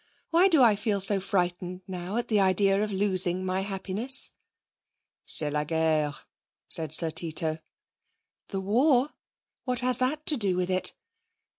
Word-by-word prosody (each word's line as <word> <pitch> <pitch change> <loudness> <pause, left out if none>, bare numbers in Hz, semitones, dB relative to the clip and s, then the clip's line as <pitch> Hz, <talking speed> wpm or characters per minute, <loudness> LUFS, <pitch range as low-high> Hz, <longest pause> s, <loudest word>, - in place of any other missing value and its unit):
Why 345 +3 +4
do 320 -8 +4
I 225 -3 +4
feel 205 0 -2
so 195 +1 -1
frightened 180 -1 -3
now 185 +2 -5
at 240 - -2
the 215 -2 +1
idea 195 +1 +3
of 215 - -4
losing 185 -2 -1
my 185 +1 -2
happiness?' 200 +6 +1 1.0
'C'est 150 -2 +1
la 150 0 -1
guerre,' 155 -1 -1 0.4
said 160 -2 +4
Sir 160 0 +2
Tito. 160 0 -1 0.9
'The 195 -2 -5
war? 250 +7 +2 0.6
What 250 -2 0
has 250 -1 0
that 300 +4 -1
to 300 - 0
do 195 -5 +3
with 180 0 -1
it?' 185 0 +2
195 Hz, 150 wpm, -26 LUFS, 175-230 Hz, 1.0 s, Why